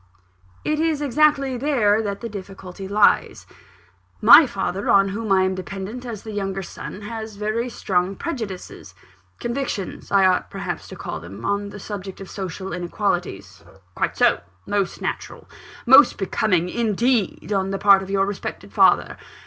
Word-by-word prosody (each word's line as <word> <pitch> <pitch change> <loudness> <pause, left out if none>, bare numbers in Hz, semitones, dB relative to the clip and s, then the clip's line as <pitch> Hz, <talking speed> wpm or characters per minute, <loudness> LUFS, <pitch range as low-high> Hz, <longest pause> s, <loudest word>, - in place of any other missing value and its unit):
"It 305 0 0
is 320 -2 +1
exactly 280 -1 +2
there 235 -6 +2
that 200 -2 -4
the 235 - -4
difficulty 195 -2 -9
lies. 205 +1 +2 0.7
My - - +9
father, 195 +3 -3
on 195 0 +5
whom 210 +1 -4
I 190 -1 +5
am 190 0 +1
dependent 195 +6 -6
as 220 -4 -7
the 220 - -7
younger 195 -2 -3
son, 190 - -8
has 220 0 -6
very 215 +4 -2
strong 190 -3 -1
prejudices 220 - -6 0.4
convictions 240 -5 -4
I 195 -1 +5
ought 185 -1 +2
perhaps - - -5
to - - -9
call - - -6
them 95 +7 -10
on 200 0 -1
the 205 - -9
subject 195 -2 -7
of 195 - -9
social 190 -1 -5
inequalities." 175 - -3 0.3
"Quite - - -2
so - - +3 0.2
most 200 -3 -2
natural; - - -5 0.4
most 265 +4 +7
becoming, 185 -2 0
indeed, 225 0 0
on 195 -1 0
the 195 - -2
part 200 -1 +6
of 190 - -8
your 195 0 +2
respected 200 0 -6
father. - - +3
200 Hz, 155 wpm, -22 LUFS, 190-230 Hz, 0.7 s, My